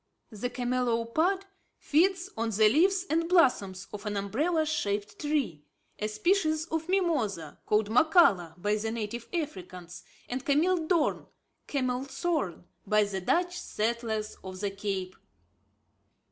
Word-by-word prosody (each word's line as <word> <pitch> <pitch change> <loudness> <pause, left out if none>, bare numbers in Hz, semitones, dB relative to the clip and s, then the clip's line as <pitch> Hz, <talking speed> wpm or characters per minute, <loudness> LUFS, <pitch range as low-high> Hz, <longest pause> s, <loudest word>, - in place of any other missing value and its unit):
The 220 +3 -3
camelopard 250 +9 0 0.3
feeds 365 +4 +1
on 230 0 -1
the 215 0 +4
leaves 365 - +3
and 330 +1 0
blossoms 205 - +3
of 210 +1 -6
an 205 -1 -2
umbrella 300 - 0
shaped 205 -9 -2
tree, 285 - -1 0.4
a 215 - -1
species 315 - +1
of 320 +1 -3
mimosa, 260 - 0
called 210 0 +2
mokhala 220 - +4
by 210 +3 +1
the 220 +1 -2
native 230 +1 -4
Africans, 185 - -5 0.3
and 255 +1 -4
cameel 320 +3 +2
doorn 335 -4 +1 0.4
(Camelthorn) 260 - -2 0.2
by 210 +1 +4
the 195 -2 -3
Dutch 355 - +1
settlers 220 -4 -2
of 185 0 -7
the 200 0 -2
Cape. 195 -2 -4
235 Hz, 125 wpm, -29 LUFS, 205-320 Hz, 0.4 s, the